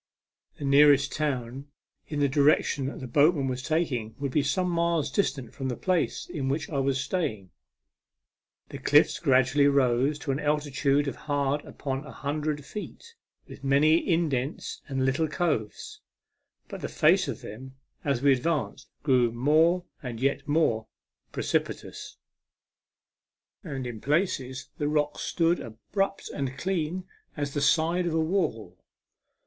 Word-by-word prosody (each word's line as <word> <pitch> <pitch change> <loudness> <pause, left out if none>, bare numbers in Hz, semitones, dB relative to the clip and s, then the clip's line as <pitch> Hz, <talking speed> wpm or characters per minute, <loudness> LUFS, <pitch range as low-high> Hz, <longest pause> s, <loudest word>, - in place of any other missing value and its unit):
The 145 - -5
nearest 140 -1 +5
town 135 -2 -3 0.4
in 150 -2 -3
the 140 - +4
direction 140 -1 +2
the 130 - -7
boatman 145 +3 +3
was 130 0 -3
taking 130 -8 -1
would 140 -2 -3
be 150 - +2
some 150 +7 0
miles 170 -4 0
distant 135 - -1
from 135 - -4
the 125 - -2
place 180 +1 -1
in 145 -7 -3
which 145 +3 -2
I 140 - 0
was 135 0 +1
staying. 125 - -2 1.2
The - - -7
cliffs - - +4
gradually 135 +2 +4
rose 135 +1 +2
to 150 -1 -3
an 135 - -1
altitude 145 -1 +1
of 140 - -3
hard 145 0 -1
upon 135 0 -4
a 135 - -10
hundred 150 0 -3
feet, 215 - -8 0.3
with - - -12
many 145 +4 +4
indents 155 -6 -1
and 135 -1 -1
little 135 +5 +1
coves; 150 -9 -2 0.7
but - - -8
the - - -4
face - - +3
of - - -5
them, 130 +5 -9 0.3
as 140 -3 0
we 140 -1 +6
advanced, 140 0 -2
grew 125 -5 +3
more 160 +9 +3 0.2
and 120 -4 -6
yet 140 +3 0
more 145 -8 +1 0.4
precipitous, - - -3 1.5
A - - -10
MEMORABLE - - -6
SWIM. - - -6
8j - - -3
and 130 -1 -4
in - - -13
places 135 -4 -1
the 145 - 0
rocks 150 -1 0
stood 170 +1 +1
abrupt 195 - -3
and 135 -1 -4
clean 180 +2 -2 0.3
as 145 -1 -3
the 145 - -1
side 165 +5 +2
of 165 - -1
a - - +2
wall. 155 - -1
145 Hz, 155 wpm, -27 LUFS, 130-155 Hz, 1.5 s, we